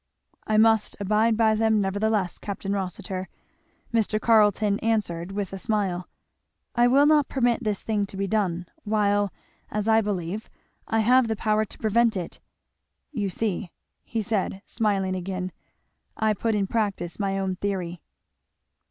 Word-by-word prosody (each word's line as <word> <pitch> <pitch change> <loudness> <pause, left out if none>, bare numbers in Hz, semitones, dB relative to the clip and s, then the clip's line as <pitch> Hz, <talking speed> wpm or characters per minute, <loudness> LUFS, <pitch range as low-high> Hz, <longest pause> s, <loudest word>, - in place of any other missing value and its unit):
"I 215 - +2
must 220 -1 +4
abide 215 +3 +2
by 220 -1 +4
them 220 0 +2
nevertheless, 200 -1 0
Capt. 200 -1 -6
Rossitur," 190 -1 -3 0.6
Mr. 220 -1 +2
Carleton 210 -2 +3
answered 195 -6 -1
with 195 -1 -3
a 195 - -5
smile. 190 -5 -1 0.7
"I 240 0 +4
will 275 +4 +5
not 300 -1 +4
permit 245 -2 +1
this 210 -3 -1
thing 210 -2 0
to 195 - -9
be 195 - 0
done, 185 -4 0 0.2
while, 205 -2 +1 0.4
as 210 0 -2
I 225 0 +5
believe, 200 0 -3 0.4
I 225 0 +2
have 250 +2 +4
the 220 - 0
power 215 0 +1
to - - -10
prevent 225 0 +2
it. 175 -2 -6 0.7
You 210 -8 -2
see," 200 -1 -2 0.3
he 225 -2 -3
said, 200 -1 -2
smiling 195 -4 0
again, 185 0 -4 0.7
"I 220 -1 +2
put 220 +2 -1
in 200 -1 +1
practice 200 -5 -2
my 195 -1 0
own 190 -1 -2
theory." 180 -4 -3
210 Hz, 150 wpm, -25 LUFS, 195-220 Hz, 0.7 s, will